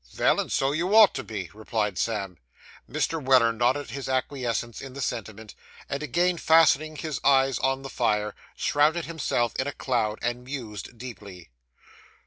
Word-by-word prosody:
'Vell, - - +3
and - - -3
so 135 0 +1
you 175 +7 0
ought 220 -2 +8
to - - -4
be,' 100 -5 -6
replied 105 -1 -2
Sam. 100 -4 -2 0.5
Mr. 165 -3 -1
Weller 130 -3 +5
nodded 125 +5 0
his 140 -1 -5
acquiescence 125 -3 -2
in 135 -1 -9
the 140 - -8
sentiment, 110 -4 -5 0.3
and 140 - -3
again 175 +5 +1
fastening 155 -1 +4
his 155 -2 -4
eyes 135 -2 +4
on 135 0 0
the - - -5
fire, 105 -5 0 0.2
shrouded 155 +3 +2
himself 145 -7 -1
in 130 - -1
a - - -1
cloud, 110 -5 -1
and 120 +1 -2
mused 125 -4 -7
deeply. 100 - -10
130 Hz, 160 wpm, -26 LUFS, 110-145 Hz, 0.5 s, ought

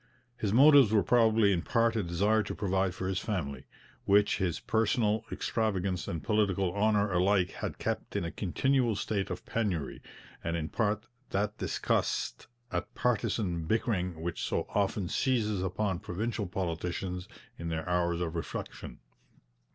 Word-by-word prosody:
His 105 -4 -2
motives 135 -1 +7
were 105 -3 +4
probably 110 -1 +4
in 85 - 0
part 115 +3 +2
a 110 - +1
desire 100 +5 +2
to 100 - -5
provide 95 -2 0
for 95 0 -3
his 95 -1 0
family, 70 - -3 0.4
which 100 +1 +4
his 90 -5 0
personal 110 -1 +1
extravagance 100 -5 -1
and 80 - -4
political 100 -4 +1
honour 105 -1 +2
alike 90 +1 +3
had - - -5
kept - - -3
in - - 0
a 85 - -3
continual 120 +4 +1
state 100 0 -2
of - - -5
penury, 95 -11 -2 0.4
and 85 0 -1
in 80 -1 -3
part 110 -1 0 0.2
that 105 +2 -1
disgust - - -1 0.2
at - - -3
partisan 100 -7 0
bickering 90 -5 0
which 85 0 -3
so - - -1
often 100 -2 0
seizes 105 -4 +1
upon 95 0 -1
provincial 105 +2 -3
politicians 90 0 -3 0.3
in 85 0 -4
their 80 0 -3
hours 85 -1 +1
of 85 -2 -2
reflection. 85 - -6
100 Hz, 150 wpm, -30 LUFS, 90-110 Hz, 0.4 s, motives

